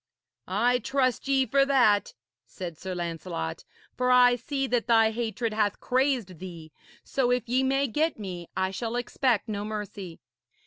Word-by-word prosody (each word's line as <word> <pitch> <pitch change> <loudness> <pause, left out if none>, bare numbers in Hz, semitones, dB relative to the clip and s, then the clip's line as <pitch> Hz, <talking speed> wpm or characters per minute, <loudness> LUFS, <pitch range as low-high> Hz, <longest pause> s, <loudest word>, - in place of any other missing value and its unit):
'I 240 +6 +2
trust 255 +1 0
ye 270 -1 +3
for 275 +1 +3
that,' 245 -8 +3 0.3
said 175 +2 -7
Sir 185 +3 -6
Lancelot, 165 - -4 0.3
'for 250 0 0
I 250 -1 +6
see 270 +3 -2
that 245 -2 0
thy 225 -2 +5
hatred 230 0 -2
hath 210 -2 0
crazed 250 - 0
thee. 170 -4 -9 0.3
So, 260 -3 0
if 245 -1 +1
ye 250 +3 +2
may 270 +1 +2
get 305 +6 0
me, 180 -5 -7
I 190 0 0
shall 230 +4 -4
expect 245 -2 0
no 205 -2 -3
mercy.' 205 -5 -6
230 Hz, 160 wpm, -27 LUFS, 190-255 Hz, 0.3 s, I